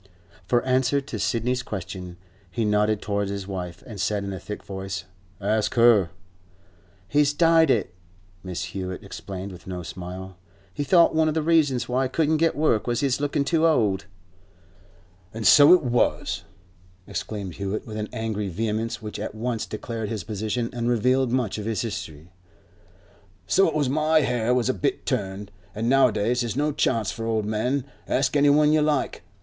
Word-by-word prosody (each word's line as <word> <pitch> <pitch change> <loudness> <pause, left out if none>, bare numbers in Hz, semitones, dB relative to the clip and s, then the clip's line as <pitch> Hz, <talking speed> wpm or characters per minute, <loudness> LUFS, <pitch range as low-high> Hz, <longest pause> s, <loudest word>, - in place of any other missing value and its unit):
For 120 +2 +2
answer 130 +2 +2
to 140 +1 -6
Sidney's 125 +2 0
question, 90 -5 -7 0.3
he 110 +6 -1
nodded 105 0 +1
towards 100 -1 -1
his 100 -1 -4
wife, 90 -3 -6
and 105 -6 -7
said 105 0 0
in 100 0 -4
a 95 - -6
thick 105 - -7
voice, 95 0 -5 0.4
'Ask 105 +2 0
her.' 115 -7 +5 1.0
'He's 145 +3 +3
dyed 165 0 +4
it,' 105 -8 +1 0.5
Mrs. 90 -2 -4
Hewett 95 -1 -5
explained, 95 0 -7
with 90 0 -13
no 90 -1 -5
smile. 90 +2 -8 0.4
'He 145 - -2
thought 170 +4 +5
one 160 0 +3
of 155 - 0
the 160 - +1
reasons 150 -6 +2
why 130 +2 +1
he - - -2
couldn't 155 +2 +1
get 165 +1 +2
work 145 -8 +1
was 120 0 0
his 140 -1 0
lookin' 145 0 0
too 165 +2 +3
old.' 105 -11 +1 1.3
'An' 115 - -4
so 145 +6 +8
it 180 -3 +6
was,' 120 -1 0 0.6
exclaimed 100 -3 -5
Hewett, 100 +1 -3
with 110 -2 -7
an 105 0 -4
angry 110 -3 -3
vehemence 110 +4 -2
which 105 - -6
at - - -5
once 115 0 -2
declared 110 0 -5
his 110 -4 -4
position 110 +3 -3
and 120 0 -1
revealed 125 +2 +2
much 120 -5 0
of 105 - -5
his 110 -1 -1
history. 90 -7 -6 1.1
'So 195 - +4
it 160 - -2
was. 145 -3 +1
My 155 +3 +3
hair 125 -2 +1
was 125 -2 +1
a 130 - +2
bit 95 - -2
turned, 100 +1 -3 0.2
an' 110 +2 -2
nowadays 125 -2 +3
there's 120 +1 -3
no 150 +1 +1
chance 115 -7 0
for 115 0 -5
old 110 -2 0
men. 120 +6 -1 0.2
Ask 135 +1 +1
any 145 0 +5
one 150 +1 +5
you 155 - +4
like. 150 -2 0
115 Hz, 175 wpm, -24 LUFS, 100-135 Hz, 1.3 s, so